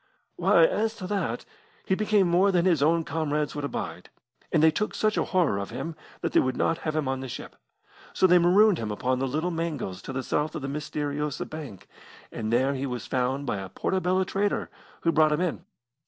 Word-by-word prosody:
"Why, - - +5
as 225 - 0
to 195 - -7
that, 180 - -2 0.4
he - - +1
became 210 -1 +3
more 180 +3 +4
than 175 -1 +2
his 170 -6 +3
own 165 +3 +3
comrades 150 -1 -1
could 145 - -4
abide, 90 -10 -5 0.4
and 160 -2 +3
they 160 - +7
took 210 +7 -2
such 215 -1 +1
a - - +1
horror 170 - +1
of 100 - -5
him 165 -1 -5 0.3
that - - -1
they - - +5
would 130 - 0
not 165 - +1
have 155 -1 -3
him 155 -3 0
on 130 0 -1
the 130 - -5
ship. - - -8 0.6
So - - +2
they 180 -1 +6
marooned 185 +2 +5
him 110 - -3
upon 125 +5 -1
the 135 - 0
Little 155 +7 -1
Mangles 155 - -3
to - - -7
the 130 0 -3
south 150 +5 -1
of 155 - -5
the - - -2
Mysteriosa 150 0 -3
Bank, 145 - -9 0.4
and 110 -1 -3
there 130 +4 +2
he 135 0 -3
was 125 -2 -4
found 130 +2 -1
by 105 - -1
a 95 -1 -6
Portobello 185 - 0
trader, 200 +2 -1 0.3
who 165 - +2
brought 155 -1 +4
him 150 - 0
in. 180 -1 -2
155 Hz, 215 wpm, -27 LUFS, 130-180 Hz, 0.6 s, they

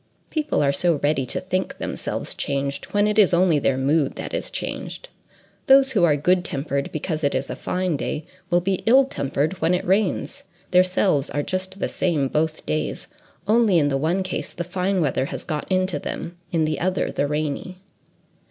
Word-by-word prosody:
People 305 - 0
are 140 - +3
so 170 +4 +2
ready 145 -3 +1
to - - -1
think 185 0 -2
themselves - - -3
changed 140 0 -2
when 205 0 +1
it 210 +1 +2
is 190 -4 +5
only 170 -4 +4
their 135 -1 +1
mood 140 +2 +1
that - - -6
is - - -2
changed! - - -5 0.6
Those 270 0 +6
who 200 -8 +2
are 155 -4 +5
good 180 +5 +2
tempered 140 -3 -3
because 155 0 -3
it 140 - +1
is 130 +1 -2
a - - -4
fine 180 -4 -1
day, 150 +2 -3 0.2
will 175 0 +3
be 190 +1 -1
ill 265 +4 +7
tempered 145 - -2
when 165 +3 +3
it 180 - -3
rains: 195 +1 0 0.3
their 180 0 +7
selves 180 -5 +1
are 145 - -1
just 185 +2 -3
the - - -1
same 155 -7 0
both 155 +2 -1
days; 75 0 -2 0.4
only 215 -4 +4
in 145 -3 +3
the 135 - 0
one 165 +7 +1
case, 185 - -4
the 175 - -3
fine 185 +2 -1
weather 135 -3 +1
has - - -6
got 155 +3 -4
into 185 -4 +1
them, 170 +4 -5 0.2
in 165 -2 +2
the 155 -2 -1
other 185 +2 0
the 145 - 0
rainy. 150 +4 -3
170 Hz, 195 wpm, -23 LUFS, 145-185 Hz, 0.6 s, ill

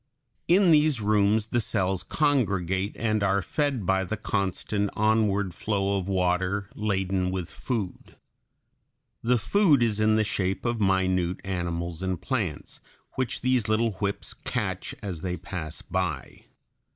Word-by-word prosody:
In 180 +1 +5
these 150 -4 +4
rooms 105 0 +3
the 120 0 +1
cells 95 -4 0
congregate 100 - 0
and 110 -2 0
are 100 -1 +2
fed 135 - -1
by 95 +1 +2
the 110 +4 -3
constant 100 0 -1
onward 105 -3 +2
flow 100 +1 0
of 95 - -5
water 95 +1 0
laden 95 -3 0
with 90 -2 -4
food. 110 -8 -4 1.1
The 125 +1 +3
food 150 - +3
is 110 -2 +1
in 110 0 +4
the 110 - +3
shape 95 -1 -2
of 120 -2 0
minute 95 -2 +1
animals 85 -2 -3
and 95 -2 -2
plants 100 - -3 0.3
which 130 -2 -2
these 125 -3 +2
little 110 +1 +2
whips 100 -1 -2
catch - - -3
as 90 -6 -4
they 90 -1 -2
pass 80 -4 -6
by. 90 -6 -3
100 Hz, 140 wpm, -26 LUFS, 95-110 Hz, 1.1 s, In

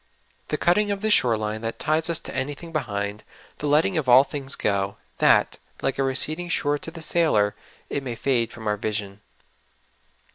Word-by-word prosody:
The - - -1
cutting 205 +4 +2
of 200 -1 -2
the 215 0 +1
shore 120 - +4
line 110 0 -3
that 115 0 -4
ties 160 +1 +1
us 170 - +2
to - - -8
anything 145 +5 -4
behind; 105 -8 -3 0.4
the 150 - -2
letting 160 +4 +3
of 135 -4 -2
all 125 +2 +8
things 140 -1 -4
go, 100 -1 -1 0.2
that, - - +4 0.2
like 135 0 0
a - - +3
receding 155 +6 -1
shore 145 -3 0
to - - -6
the 165 0 -9
sailor, 150 -11 +2 0.3
it 140 - -2
may 125 -3 -5
fade 120 -2 0
from 110 - -10
our 105 0 0
vision. 105 -1 -4
135 Hz, 185 wpm, -24 LUFS, 110-160 Hz, 0.4 s, all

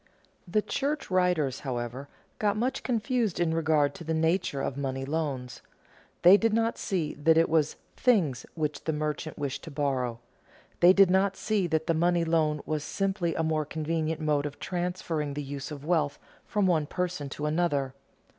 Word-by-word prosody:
The 210 +4 +1
church 290 -4 -2
writers, 180 -8 +2
however, 125 +1 -4 0.3
got 210 0 +1
much 250 +4 -1
confused 235 -4 0
in 170 -2 +1
regard 155 -3 +2
to - - -9
the 160 0 -1
nature 160 -2 +1
of 135 - -2
money 135 -1 -3
loans. 140 -4 -3 0.6
They 180 +3 +9
did 225 0 +1
not 230 +1 +1
see 170 -6 -1
that 160 +2 +3
it 165 - +5
was 155 -2 +1 0.2
things 180 - +2
which 150 -3 -3
the 160 - 0
merchant 150 +1 -3
wished 140 -2 -3
to - - -7
borrow. 135 -5 -1 0.6
They 175 +1 +8
did 195 -1 +5
not 190 +1 +2
see 205 -4 0
that 160 -1 0
the 165 - +2
money 170 +1 +2
loan 155 -2 +1
was 155 -1 -2
simply 190 0 -1
a 165 - 0
more 155 -1 +1
convenient 160 +1 -2
mode 150 -2 +1
of 145 - -9
transferring 175 -5 -3
the 145 - -3
use 140 0 -6
of 145 -2 -8
wealth 155 -4 +1 0.3
from 205 -2 +1
one 160 -5 +2
person 180 -6 -3
to 150 +2 -5
another. 150 -4 0
160 Hz, 175 wpm, -28 LUFS, 145-180 Hz, 0.6 s, They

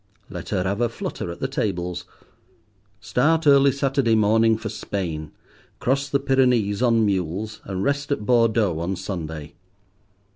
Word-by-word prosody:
Let - - -7
her 90 - 0
have 100 +4 -1
a 120 - +2
flutter 110 - -5
at 85 - -8
the 135 - 0
tables. 90 -9 -3 1.0
Start 155 +8 +1
early 140 -1 +6
Saturday 135 -4 +1
morning 110 +1 +3
for 110 0 -5
Spain, 80 -7 -4 0.5
cross 140 +2 0
the 140 - +1
Pyrenees 125 -6 +2
on 115 -3 +3
mules, 100 +2 -2
and 95 -1 -3
rest 140 +2 -1
at 105 -7 -1
Bordeaux 115 -7 +2
on 90 +3 -2
Sunday. 80 -6 -6
110 Hz, 145 wpm, -23 LUFS, 95-130 Hz, 1.0 s, early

